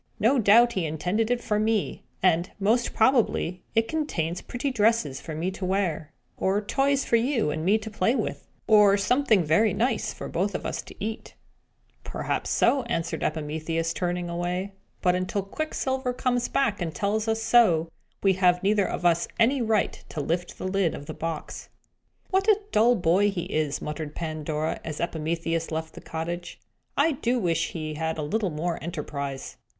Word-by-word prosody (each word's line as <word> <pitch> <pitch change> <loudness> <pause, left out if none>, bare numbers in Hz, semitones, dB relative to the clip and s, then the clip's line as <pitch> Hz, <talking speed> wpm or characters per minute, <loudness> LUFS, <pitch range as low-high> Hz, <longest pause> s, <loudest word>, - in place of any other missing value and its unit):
No 250 +6 +4
doubt 235 +3 +6
he 185 - -1
intended 180 +9 -1
it 245 -1 0
for 210 -2 0
me; 215 -1 0 0.2
and, 175 -1 +3
most 225 +5 +2
probably, 220 -7 +2
it 225 0 +3
contains 185 - -2
pretty 260 +3 -3
dresses 215 - +1
for 160 - -6
me 170 +4 -1
to 190 - -8
wear, 180 -5 -1 0.3
or 195 +2 +1
toys 270 +6 +1
for 235 - +3
you 230 - +1
and 155 +1 -3
me 200 +5 +4
to 220 0 -7
play 215 +4 +1
with, 225 - -3 0.2
or 210 -2 +6
something 235 -2 +3
very 175 +7 +3
nice 235 +1 0
for - - -8
us 195 +4 -1
both - - -4
to - - -12
eat!" 220 +2 -5 0.7
"Perhaps - - -3
so," 275 - +3
answered 165 -8 -2
Epimetheus, 160 +2 -2
turning 175 0 -2
away. 175 +3 -2 0.3
"But 180 - +4
until 185 +2 -1
Quicksilver 265 +1 -2
comes 245 -1 0
back 210 -8 0
and 165 -3 -3
tells 210 +5 0
us 225 0 0
so, 180 -11 +4 0.4
we 195 -1 +5
have 180 -1 +3
neither 205 0 +3
of - - -4
us 170 -1 +3
any 250 +4 +3
right 220 -3 0
to 155 - -5
lift 170 +4 -2
the - - -4
lid 185 -3 +1
of 145 - -8
the - - -6
box." 165 -1 -5 0.6
"What 385 +2 +2
a 425 -2 +5
dull 235 +3 +5
boy 185 +2 +3
he 185 -4 -3
is!" 155 -4 -2
muttered 150 0 -5
Pandora, 155 -1 -3
as 155 -2 -5
Epimetheus 165 0 -2
left 160 0 -4
the - - -10
cottage. 170 +2 -5 0.4
"I 310 +3 +4
do 250 -3 0
wish 175 -8 0
he 155 -2 -4
had 160 +1 -2
a 155 - -2
little 200 +6 0
more 165 +2 -3
enterprise!" 140 -4 -5
190 Hz, 175 wpm, -26 LUFS, 165-225 Hz, 0.7 s, doubt